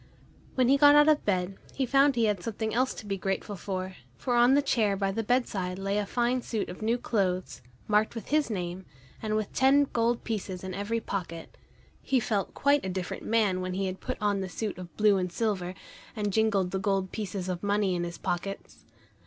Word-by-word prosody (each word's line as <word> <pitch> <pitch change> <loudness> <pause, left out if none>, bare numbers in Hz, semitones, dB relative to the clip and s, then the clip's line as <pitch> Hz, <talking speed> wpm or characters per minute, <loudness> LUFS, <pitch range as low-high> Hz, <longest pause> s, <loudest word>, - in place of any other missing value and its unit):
When 255 -2 +3
he 275 +2 +5
got 290 +1 +7
out 295 0 +7
of 305 -1 +3
bed 185 -1 0 0.2
he 270 - 0
found 275 +2 +4
he 230 -1 +3
had 205 -4 0
something 220 +2 -3
else 255 +3 +1
to - - -9
be 195 -1 -3
grateful 195 +2 -2
for, 185 -1 -5 0.2
for 245 - -2
on 240 +3 +6
the 285 - +3
chair 215 -7 +1
by 195 0 0
the 225 - -1
bedside 205 -6 0
lay 195 +1 -1
a 205 - -2
fine 245 +2 +1
suit 225 -3 -3
of 180 - -8
new 225 +3 +1
clothes, 185 -6 -1 0.3
marked 215 +2 +2
with 230 - -7
his 300 -2 +2
name, 180 -2 -4 0.3
and 215 -1 -1
with 215 -1 -2
ten 270 +2 +5
gold 235 0 +1
pieces 195 -5 -4
in 185 0 -5
every 205 +4 -2
pocket. 170 -6 -5 0.5
He 265 - +1
felt 210 -4 -2
quite 285 0 +3
a 190 - -3
different 185 -1 -4
man 210 -5 +2
when 185 0 -3
he 195 +1 -1
had 185 0 -4
put - - -4
on 205 -2 +1
the 190 - -4
suit 205 0 -4
of 180 -1 -10
blue 210 -2 +4
and 180 -1 -2
silver, 190 -3 -1 0.4
and 205 -2 -2
jingled 205 -4 +2
the 190 - -1
gold 195 -1 0
pieces 195 -3 -4
of 180 -1 -3
money 205 -1 +1
in 175 -1 -1
his 170 0 -5
pockets. 195 +3 -5
205 Hz, 215 wpm, -28 LUFS, 185-230 Hz, 0.5 s, got